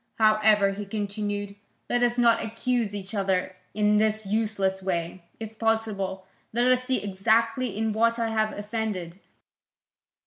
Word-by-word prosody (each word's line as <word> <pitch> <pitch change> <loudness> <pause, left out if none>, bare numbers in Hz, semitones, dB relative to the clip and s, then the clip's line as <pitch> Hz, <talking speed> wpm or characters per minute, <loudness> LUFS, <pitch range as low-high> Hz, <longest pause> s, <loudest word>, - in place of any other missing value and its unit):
However," 215 -2 +4
he 205 +1 -5
continued, 205 0 -3 0.3
"let 245 - +1
us 240 0 +2
not 235 -1 +4
accuse 230 -1 -1
each 195 +1 -6
other 190 -2 0 0.2
in 210 0 +3
this 215 0 +1
useless 195 -2 0
way; 175 -1 -3
if 220 0 -8
possible, 210 -4 -1 0.3
let 240 +2 +3
us 255 0 +2
see 255 -3 0
exactly 225 +3 +1
in 220 0 0
what 230 +2 +2
I 230 -1 0
have 220 -1 0
offended. 205 -5 -4
215 Hz, 140 wpm, -26 LUFS, 195-225 Hz, 0.3 s, However